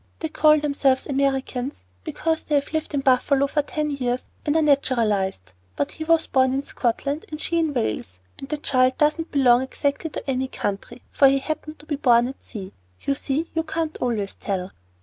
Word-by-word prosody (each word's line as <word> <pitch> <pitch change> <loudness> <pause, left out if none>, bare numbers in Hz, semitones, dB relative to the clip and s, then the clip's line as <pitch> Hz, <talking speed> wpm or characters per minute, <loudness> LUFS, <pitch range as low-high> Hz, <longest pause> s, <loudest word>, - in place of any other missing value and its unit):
They 320 - -3
call 305 0 +5
themselves 280 -3 +1
Americans 270 - -1 0.2
because 320 - -1
they 300 - -1
have 285 +2 0
lived 315 -1 -2
in 280 - +1
Buffalo 270 +1 +3
for 295 +2 +1
ten 300 +1 -2
years 250 -3 -1 0.2
and 295 - 0
are 320 - +4
naturalized; 215 - +1 0.2
but 140 - -1
he 315 - -6
was 330 0 +3
born 260 -1 +2
in 275 - -1
Scotland 280 +4 -2
and 305 - -6
she 335 +1 0
in 320 -2 +1
Wales, 105 - -3 0.2
and 270 - -8
the 300 - -1
child 255 -3 +2
doesn't 305 +2 +1
belong 250 -3 +5
exactly 280 +4 -2
to - - -7
any 265 0 0
country, 205 +1 -5
for 275 - +6
he 270 +1 +4
happened 310 +2 -4
to 295 - -16
be 295 -2 -2
born 240 -3 +4
at 270 - -9
sea. 195 -4 -8 0.3
You 275 - 0
see 285 +3 -2
you 325 - +1
can't 320 0 -3
always 215 -5 -2
tell." 190 -2 -4
275 Hz, 195 wpm, -23 LUFS, 250-300 Hz, 0.3 s, for